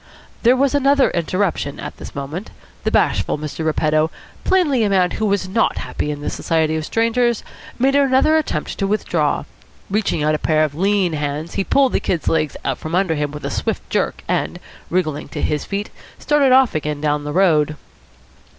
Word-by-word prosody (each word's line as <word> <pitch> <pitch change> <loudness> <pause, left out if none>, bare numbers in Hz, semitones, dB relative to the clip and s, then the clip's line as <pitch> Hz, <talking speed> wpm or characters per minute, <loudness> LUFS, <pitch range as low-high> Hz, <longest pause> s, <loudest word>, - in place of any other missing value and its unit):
There 240 +2 +5
was 275 +1 +2
another 280 -1 +3
interruption 170 -4 -1
at - - -7
this - - -10
moment. 150 +9 -5 0.4
The - - +3
bashful - - +1
Mr. 150 +1 -5
Repetto, 155 0 +1 0.3
plainly 305 -11 +2
a 210 - +2
man 185 -2 +3
who 220 - -1
was 200 -2 0
not 215 +5 +1
happy - - -3
in 145 -1 -4
the - - -2
society 160 -1 0
of 160 - -2
strangers, 230 0 +1 0.3
made 265 +2 +2
another 280 +2 +4
attempt 290 - -2
to 195 - +1
withdraw. 170 -7 0 0.5
Reaching 200 -7 0
out 155 +1 +2
a 155 - 0
pair 155 -1 +2
of 150 -2 -1
lean 190 +1 +1
hands, 150 +2 -3
he 195 - 0
pulled 270 +5 +3
the - - +2
Kid's 170 -3 -2
legs 155 -2 +1 0.2
from 160 +2 -4
under 185 -3 +2
him 150 -1 -1
with 150 +1 -8
a - - -2
swift - - -2
jerk, - - -1
and, - - -1 0.3
wriggling 155 -5 -1
to - - -6
his 150 - -1
feet, 200 +1 -4 0.3
started 290 -3 +2
off 260 -1 +5
again 150 -1 -2
down 150 0 0
the 145 - -4
road. 155 -4 +3
180 Hz, 185 wpm, -20 LUFS, 155-230 Hz, 0.5 s, There